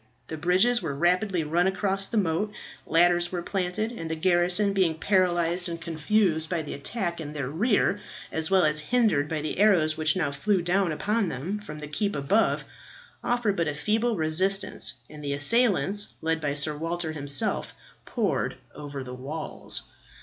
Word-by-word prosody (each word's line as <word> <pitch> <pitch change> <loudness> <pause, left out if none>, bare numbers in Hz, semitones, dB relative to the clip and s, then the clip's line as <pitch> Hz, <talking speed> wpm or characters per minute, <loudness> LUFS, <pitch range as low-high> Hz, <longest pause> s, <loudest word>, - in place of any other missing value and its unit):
The 160 - -4
bridges 185 +9 +3
were 150 -5 -3
rapidly 180 +3 +1
run 170 +4 +1
across 195 0 0
the 230 - -2
moat, 195 +2 0 0.4
ladders 175 +1 +3
were 175 -2 -3
planted, 195 +4 -2
and 165 -9 -6
the 160 - -1
garrison 180 +4 +4
being 180 -5 +1
paralyzed 175 -1 +1
and 170 0 -5
confused 165 0 0
by 170 -3 -1
the 150 - -6
attack 170 +2 -3
in 150 -1 -7
their 140 -3 -4
rear, 205 - +1 0.3
as 160 0 -1
well 190 -3 +4
as 150 0 +4
hindered 180 -5 +1
by 155 -2 -2
the 155 +4 -4
arrows 170 -7 +4
which 155 +1 +1
now 155 -6 0
flew 180 +6 0
down 180 0 +1
upon 205 +5 0
them 165 +10 -4
from 180 -8 -9
the 150 -1 -7
keep 200 +8 -1
above, 150 +11 +1 0.6
offered 240 -4 0
but 170 -3 0
a 145 - -2
feeble 220 +9 0
resistance, 175 -2 +1
and 150 -1 -11
the 140 -1 -2
assailants, 205 - +2
led 160 0 -1
by 145 -2 -1
Sir 150 +1 -1
Walter 165 +1 -3
himself, 145 -3 -1 0.3
poured - - -1 0.2
over 145 -2 -7
the 125 -1 -8
walls. 140 +5 -5
175 Hz, 170 wpm, -26 LUFS, 155-195 Hz, 0.6 s, garrison